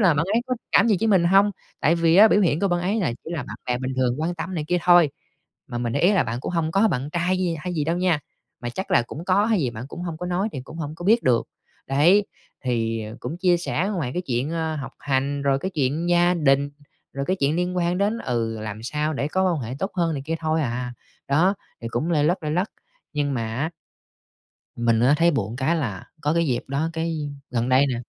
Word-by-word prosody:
là 185 Hz, -7 st, +5 dB
bạn 155 Hz, +3 st, +1 dB
ấy 230 Hz, -, +4 dB
có 255 Hz, -, 0 dB, 0.2 s
cảm 235 Hz, -, +5 dB
gì 210 Hz, -, +4 dB
với 225 Hz, -, +2 dB
mình 190 Hz, -5 st, +4 dB
hông? 195 Hz, +4 st, +5 dB, 0.3 s
Tại 155 Hz, -, +4 dB
vì 165 Hz, 0 st, +3 dB
á, 215 Hz, +3 st, +9 dB
biểu 205 Hz, -, +4 dB
hiện 165 Hz, -5 st, +2 dB
của 200 Hz, -, +2 dB
bạn 175 Hz, -1 st, +1 dB
ấy 190 Hz, +5 st, 0 dB
là 170 Hz, -, 0 dB
chỉ -, -, -7 dB
là 155 Hz, -, -2 dB
bạn -, -, -8 dB
bè 125 Hz, -1 st, 0 dB
bình 130 Hz, +1 st, -3 dB
thường 130 Hz, +1 st, +1 dB
quan 170 Hz, +3 st, -1 dB
tâm 180 Hz, +2 st, -5 dB
này 155 Hz, -3 st, -2 dB
kia 180 Hz, -, +2 dB
thôi. 175 Hz, -4 st, +6 dB, 0.6 s
Mà 120 Hz, -, -4 dB
mình 120 Hz, -1 st, -2 dB
để 140 Hz, -, 0 dB
ý 180 Hz, +5 st, +5 dB
là 195 Hz, -, +4 dB
bạn 115 Hz, +1 st, -3 dB
cũng -, -, -4 dB
hông 165 Hz, -2 st, 0 dB
có 200 Hz, +4 st, +4 dB
bạn 130 Hz, -5 st, -2 dB
trai 175 Hz, +2 st, +1 dB
gi 180 Hz, -2 st, 0 dB
hay 180 Hz, +3 st, -4 dB
gì 155 Hz, -3 st, 0 dB
đâu 165 Hz, +3 st, 0 dB
nha, 180 Hz, -4 st, +1 dB, 0.4 s
mà 120 Hz, -, -2 dB
chắc 190 Hz, +10 st, -5 dB
là -, -, +4 dB
cũng 150 Hz, +7 st, -8 dB
có 190 Hz, +3 st, +3 dB
hay 220 Hz, -4 st, +2 dB
gì 130 Hz, -5 st, 0 dB
bạn 115 Hz, 0 st, -7 dB
cũng 175 Hz, -, -7 dB
hông 170 Hz, -3 st, -4 dB
có 180 Hz, -, -4 dB
nói 180 Hz, +4 st, 0 dB
thì 135 Hz, -, -5 dB
cũng 155 Hz, -, -11 dB
hổng 150 Hz, -2 st, -4 dB
có 175 Hz, -, -9 dB
biết 225 Hz, +5 st, +4 dB
được. 120 Hz, -2 st, +2 dB, 0.4 s
Đấy, 170 Hz, +10 st, +4 dB, 0.4 s
thì 115 Hz, -2 st, 0 dB, 0.2 s
cũng 165 Hz, -, -5 dB
chia 180 Hz, -1 st, +3 dB
sẻ 175 Hz, +2 st, -1 dB
ngoài 150 Hz, -9 st, -2 dB
cái 180 Hz, -, -1 dB
chuyện, 130 Hz, 0 st, -1 dB
ơ, 160 Hz, -1 st, -2 dB
học 140 Hz, -3 st, -6 dB
hành, 140 Hz, +1 st, -1 dB
rồi 135 Hz, -1 st, +2 dB
cái 190 Hz, +7 st, -3 dB
chuyện 150 Hz, +1 st, -1 dB
gia 175 Hz, +1 st, +4 dB
đình, 140 Hz, -3 st, +2 dB, 0.4 s
rồi 140 Hz, 0 st, -3 dB
cái 185 Hz, -, +1 dB
chuyện 145 Hz, -1 st, +1 dB
liên 180 Hz, +1 st, -1 dB
quan 175 Hz, 0 st, +1 dB
đến: 205 Hz, +3 st, +1 dB
"Ừ, 115 Hz, -, -2 dB
làm 110 Hz, 0 st, -6 dB
sao 150 Hz, +5 st, -1 dB
để 140 Hz, +1 st, -1 dB
có 190 Hz, +4 st, +1 dB
quan 160 Hz, -, -2 dB
hệ 120 Hz, +2 st, -5 dB
tốt 195 Hz, +5 st, -2 dB
hơn 170 Hz, -3 st, +1 dB
này 135 Hz, -, -4 dB
kia 165 Hz, -, -1 dB
thôi 160 Hz, 0 st, +1 dB
à" 125 Hz, -1 st, -3 dB, 0.3 s
Đó, 170 Hz, +8 st, +3 dB, 0.3 s
thì 115 Hz, -, -3 dB
cũng 120 Hz, +9 st, -2 dB
lây 150 Hz, -3 st, +2 dB
lất 175 Hz, +4 st, +1 dB
lây 150 Hz, -1 st, -2 dB
lất, 180 Hz, +6 st, 0 dB, 0.4 s
nhưng 145 Hz, -2 st, -1 dB
mà 115 Hz, -3 st, -2 dB
á 155 Hz, +5 st, -1 dB, 1.1 s
mình 115 Hz, -1 st, +2 dB
á, 125 Hz, +4 st, +5 dB
thấy 170 Hz, +2 st, +4 dB
buồn 115 Hz, -5 st, -2 dB
cái 135 Hz, +6 st, +1 dB
là 115 Hz, -, -3 dB, 0.2 s
có 150 Hz, +1 st, +1 dB
cái 170 Hz, 0 st, +2 dB
dịp 120 Hz, -3 st, 0 dB
đó, 140 Hz, +4 st, -1 dB
cái, 165 Hz, 0 st, -2 dB, 0.3 s
gần 120 Hz, 0 st, -1 dB
đây 130 Hz, +2 st, +5 dB
nè, 130 Hz, -, -1 dB
160 Hz, 260 wpm, -24 LUFS, 130-180 Hz, 1.1 s, á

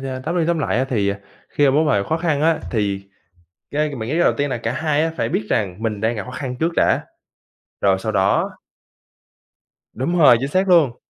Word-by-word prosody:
nha, 130 Hz, -1 st, -4 dB
tóm 165 Hz, +4 st, -2 dB
đi 165 Hz, -, +2 dB
tóm 170 Hz, -1 st, +1 dB
lại 115 Hz, -6 st, 0 dB
á 130 Hz, -, +2 dB
thì, 105 Hz, -6 st, 0 dB
à, 100 Hz, 0 st, -2 dB, 0.3 s
khi 145 Hz, -, +1 dB
mà 135 Hz, -, +5 dB
mốt 155 Hz, +3 st, +2 dB
mà 115 Hz, -9 st, +2 dB
khó 160 Hz, +10 st, -1 dB
khăn 165 Hz, -4 st, 0 dB
á, 165 Hz, 0 st, +3 dB
thì 100 Hz, -3 st, -2 dB, 0.6 s
cái 150 Hz, 0 st, -1 dB
mình 110 Hz, -3 st, -5 dB
nghĩ -, -, -1 dB
cái 165 Hz, -, +1 dB
đầu -, -, +4 dB
tiên 145 Hz, 0 st, 0 dB
là 125 Hz, -, -2 dB
cả 115 Hz, 0 st, -3 dB
hai 150 Hz, +2 st, 0 dB
á 165 Hz, -, -1 dB
phải 115 Hz, -, -1 dB
biết 110 Hz, -, -1 dB
rằng 100 Hz, 0 st, -1 dB
mình 105 Hz, -3 st, -2 dB
đang 110 Hz, +2 st, 0 dB
gặp 105 Hz, -, -5 dB
khó 125 Hz, -, -8 dB
khăn 125 Hz, 0 st, -5 dB
trước 165 Hz, +1 st, 0 dB
đã, -, -, +3 dB, 0.8 s
rồi 95 Hz, -1 st, +3 dB
sau 110 Hz, +3 st, -3 dB
đó 95 Hz, -1 st, +2 dB, 1.4 s
Đúng 170 Hz, +9 st, -1 dB
rồi, 145 Hz, -7 st, +7 dB
chính 135 Hz, -, -2 dB
xác 185 Hz, +6 st, +1 dB
luôn! 155 Hz, -9 st, +4 dB
130 Hz, 240 wpm, -20 LUFS, 110-155 Hz, 1.4 s, rồi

